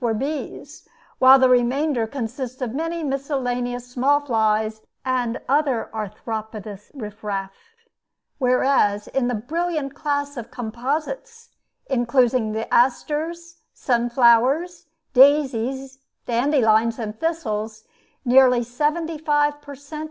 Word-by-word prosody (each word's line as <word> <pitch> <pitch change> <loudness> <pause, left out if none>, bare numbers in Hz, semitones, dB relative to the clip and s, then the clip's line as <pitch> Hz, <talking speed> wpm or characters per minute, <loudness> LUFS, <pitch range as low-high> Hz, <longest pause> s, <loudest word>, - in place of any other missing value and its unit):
were 235 -2 +1
bees, 280 +6 -6 0.3
while 260 +1 +8
the 260 -1 +5
remainder 250 0 +2
consisted 250 0 -5
mainly 330 +4 -3
of - - -3
miscellaneous 250 -3 -2
small 260 +4 +2
flies 220 -4 0 0.2
and 250 -2 -1
other 275 -4 +1
arthropodous 215 -1 -6
riff 215 -5 -8
raff, 195 -2 -3 0.9
whereas, 250 -5 +2
in 265 -2 0
the 245 - -1
brilliant 305 +4 -3
class 285 0 -2
of 235 - -6
composites, 305 - -4 0.4
including 245 -2 +1
the 220 +1 -4
asters, 320 +7 0 0.2
sunflowers, 255 +8 +2 0.3
daisies, 270 -1 +3 0.3
dandelions, 230 -3 +2
and 215 -2 -6
thistles, 220 -10 -3 0.4
nearly 250 -1 +5
seventy 305 +6 -2
five 295 -1 +1
per 285 -1 -10
cent. 285 +3 -9
255 Hz, 105 wpm, -22 LUFS, 230-290 Hz, 0.9 s, while